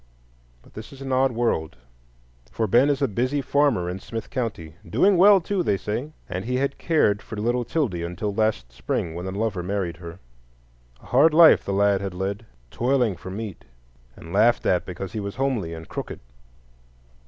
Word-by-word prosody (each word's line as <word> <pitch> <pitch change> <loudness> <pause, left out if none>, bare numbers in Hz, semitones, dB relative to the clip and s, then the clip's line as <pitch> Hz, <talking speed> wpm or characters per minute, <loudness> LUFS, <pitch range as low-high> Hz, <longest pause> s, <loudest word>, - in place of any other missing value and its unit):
But - - -21
this 110 +6 -9
is 135 - -13
an 135 - -5
odd 130 0 +3
world; 115 - -1 0.8
for 115 - -1
Ben 120 +7 +4
is 145 0 0
a - - +3
busy 130 +7 -1
farmer 140 -9 +1
in 90 +2 -4
Smith 115 +3 -7
County, 115 - -4
"doing 185 - +3
well, 195 +2 +7
too," 190 +2 -2
they 105 - +1
say, 120 +10 -4 0.2
and 95 0 -4
he 125 +2 -1
had 140 +2 -1
cared 125 -11 +2
for - - -9
little 120 +4 0
'Tildy 120 - -1
until 90 +5 -3
last 105 - -1
spring, 80 +6 -3
when 90 +3 -6
a - - -2
lover 100 -1 -2
married 90 -2 -3
her. 85 -1 -9 0.9
A - - -15
hard 150 +5 +4
life 165 -1 +7
the - - -4
lad 100 0 +2
had 95 -2 -5
led, 100 +4 -4 0.2
toiling 125 -4 +1
for 95 - -10
meat, 100 -1 -6 0.5
and 80 - -11
laughed 115 +4 +3
at 90 - +1
because 90 +1 -6
he 110 - -3
was 100 -1 -5
homely 130 -10 -1
and 80 0 -10
crooked. - - -6
110 Hz, 190 wpm, -24 LUFS, 95-130 Hz, 0.9 s, well